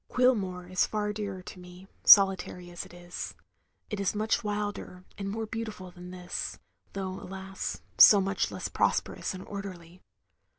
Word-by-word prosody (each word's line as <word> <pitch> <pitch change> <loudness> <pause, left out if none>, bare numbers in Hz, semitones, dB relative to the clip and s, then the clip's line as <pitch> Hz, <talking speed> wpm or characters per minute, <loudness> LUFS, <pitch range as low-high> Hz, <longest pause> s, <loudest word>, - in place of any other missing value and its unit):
Cuilmore 200 -8 +2
is 185 0 +1
far 210 -1 -1
dearer 200 -3 -5
to 180 - -10
me, 180 +1 -13 0.2
solitary 190 -3 +6
as 175 - -6
it - - -18
is. 175 0 -7 0.6
It 210 - -2
is 200 +1 0
much 215 +2 0
wilder 205 -3 -4
and 195 -1 -4
more 220 +2 -3
beautiftd 215 -5 -6
than 180 0 -10
this, 180 -1 -5 0.4
though 190 -1 -4
alas, 190 +1 -6 0.2
so 205 - +10
much 195 +1 0
less - - -4
prosperous - - 0
and 185 - -8
orderly. 185 -3 -8
195 Hz, 155 wpm, -29 LUFS, 180-205 Hz, 0.6 s, so